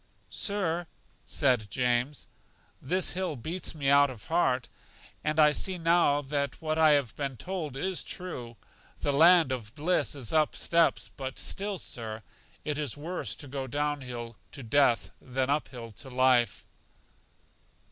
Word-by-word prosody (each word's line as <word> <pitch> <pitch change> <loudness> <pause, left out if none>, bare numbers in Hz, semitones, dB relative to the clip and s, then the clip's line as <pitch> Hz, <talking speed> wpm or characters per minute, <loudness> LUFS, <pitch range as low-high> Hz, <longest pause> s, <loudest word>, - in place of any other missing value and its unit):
Sir, 175 -4 0 0.4
said 125 -8 +2
James, 125 +4 0 0.6
this 185 +8 +1
hill 180 -3 -2
beats 160 +9 -4
me 140 -3 -2
out 140 0 +6
of 120 -5 -9
heart! 130 -7 +1 0.6
And 155 +1 0
I 150 -1 +7
see 185 +5 -1
now 165 -4 +3
that 140 0 -2
what 155 -1 -1
I 155 -1 +7
have 140 -6 +1
been 140 -3 -3
told 165 -6 -4
is 185 +5 -1
true; 125 -11 -6 0.4
the 145 - +1
land 165 0 +6
of 115 -2 -5
bliss 160 +1 +1
is 130 -3 -4
up 155 -1 +3
steps; 170 -1 +2
but 135 -1 -5
still, 200 0 -2
Sir, 110 -7 -4 0.4
it 150 -1 -2
is 145 -3 -2
worse 170 +5 -3
to 145 - -7
go 135 0 -4
down 145 +2 -1
hill 120 -3 -7 0.2
to 135 - -7
death 115 -6 +3
than 130 +1 -1
up 150 +1 0
hill 120 -3 -9
to 120 +7 -9
life. 125 -3 +3
145 Hz, 155 wpm, -29 LUFS, 125-160 Hz, 0.6 s, I